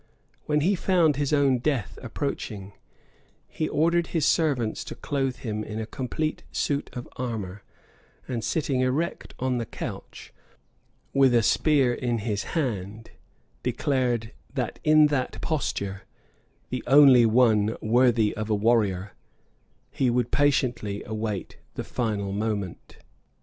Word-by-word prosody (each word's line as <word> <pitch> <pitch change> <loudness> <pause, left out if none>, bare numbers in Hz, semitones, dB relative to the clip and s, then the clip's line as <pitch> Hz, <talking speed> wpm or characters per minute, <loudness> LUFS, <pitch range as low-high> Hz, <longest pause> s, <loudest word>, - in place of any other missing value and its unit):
When 150 0 +2
he 185 +7 +3
found 175 -6 +2
his 145 -1 0
own 140 -4 +3
death 130 -5 -2
approaching, 110 -6 -5 0.7
he 155 - -3
ordered 170 +2 +2
his 160 -4 0
servants 135 -11 +1
to - - -7
clothe 135 -3 -2
him 110 -3 -4
in 110 +1 -5
a 110 - -3
complete 135 +7 -3
suit 140 -1 -1
of 125 - -6
armor; 105 -6 -4 0.7
and 120 -4 -3
sitting 140 -2 0
erect 140 +7 -2
on 125 -1 -1
the 115 - -3
couch, - - -8 0.8
with 135 -3 +4
a 115 - +4
spear 140 -1 +3
in 120 -1 -1
his 105 -1 -2
hand, 110 - -3 0.5
declared, 120 -5 0 0.2
that 125 -3 -3
in 155 0 +6
that 130 -3 -1
posture, 100 - -2 0.7
the 125 - -3
only 135 -3 +7
one 110 -2 +3
worthy 115 -1 +3
of 110 0 -4
a 105 - +2
warrior, 100 -3 +1 0.8
he 130 - +1
would 120 -1 0
patiently 125 -8 +1
await 110 -2 -4 0.2
the - - -3
fatal 105 -5 -2
moment. 100 -3 -4
125 Hz, 130 wpm, -26 LUFS, 110-140 Hz, 0.8 s, only